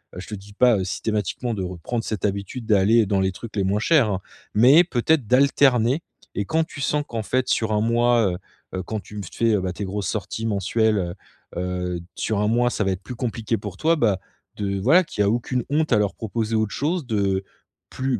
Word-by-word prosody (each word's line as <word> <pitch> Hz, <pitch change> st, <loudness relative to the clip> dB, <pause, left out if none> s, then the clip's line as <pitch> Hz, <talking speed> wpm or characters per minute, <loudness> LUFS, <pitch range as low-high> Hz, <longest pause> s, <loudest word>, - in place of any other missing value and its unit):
Heu, 90 Hz, -, -6 dB
je -, -, -11 dB
te 105 Hz, -, -5 dB
dis 100 Hz, +1 st, -12 dB
pas, 120 Hz, +1 st, +4 dB
heu, 95 Hz, -, -1 dB
systématiquement 110 Hz, +4 st, -2 dB
de 95 Hz, -, -3 dB
reprendre 90 Hz, +6 st, -4 dB
cette 105 Hz, -4 st, -2 dB
habitude 100 Hz, +4 st, -3 dB
d'aller 110 Hz, +2 st, +4 dB
dans 95 Hz, -1 st, +1 dB
les 95 Hz, 0 st, +1 dB
trucs 115 Hz, +3 st, -9 dB
les 100 Hz, -, +2 dB
moins 100 Hz, +2 st, +1 dB
chers, 135 Hz, 0 st, +4 dB
hein. 95 Hz, 0 st, -2 dB, 0.3 s
Mais, 135 Hz, +10 st, +7 dB
peut-être, 145 Hz, -2 st, +1 dB
d'alterner 130 Hz, +1 st, +4 dB, 0.3 s
et 100 Hz, -, -1 dB
quand 160 Hz, +7 st, +1 dB
tu 150 Hz, -, -11 dB
sens 150 Hz, +1 st, +1 dB
qu'en 115 Hz, -2 st, -4 dB
fait 130 Hz, +4 st, 0 dB
sur 110 Hz, -1 st, +1 dB
1 105 Hz, -, +2 dB
mois, 115 Hz, -3 st, +3 dB, 0.4 s
heu, 95 Hz, -1 st, -3 dB
quand 110 Hz, +3 st, -4 dB
tu 105 Hz, -, -11 dB
me 100 Hz, -, -4 dB
fais, 110 Hz, +4 st, +1 dB
bah, 90 Hz, -1 st, -3 dB
tes 100 Hz, -, -4 dB
grosses 100 Hz, 0 st, -3 dB
sorties 110 Hz, +1 st, -3 dB
mensuelles, 110 Hz, +2 st, +1 dB
heu, 85 Hz, -1 st, -3 dB, 0.4 s
heu, 90 Hz, -1 st, -2 dB
d 85 Hz, -, -15 dB
sur 110 Hz, -2 st, -1 dB
1 105 Hz, -, +2 dB
mois 120 Hz, +1 st, +3 dB
ça 110 Hz, -, -1 dB
va 95 Hz, -, +1 dB
être 95 Hz, 0 st, -4 dB
plus 125 Hz, -, -7 dB
compliqué 115 Hz, -2 st, -2 dB
pour 100 Hz, -3 st, -7 dB
toi. 165 Hz, +7 st, +3 dB
Bah, 105 Hz, -, +1 dB, 0.4 s
de 100 Hz, -1 st, -2 dB
voilà 150 Hz, -, +5 dB
qui 105 Hz, -, -3 dB
a 100 Hz, -, +3 dB
aucune 120 Hz, +2 st, -1 dB
honte 155 Hz, 0 st, +1 dB
à -, -, +5 dB
leur 100 Hz, -1 st, 0 dB
proposer 110 Hz, 0 st, -3 dB
autre 110 Hz, -1 st, 0 dB
chose, 155 Hz, -1 st, -1 dB
de 100 Hz, -3 st, 0 dB, 0.5 s
plus 130 Hz, -4 st, -2 dB
110 Hz, 225 wpm, -23 LUFS, 100-120 Hz, 0.5 s, Mais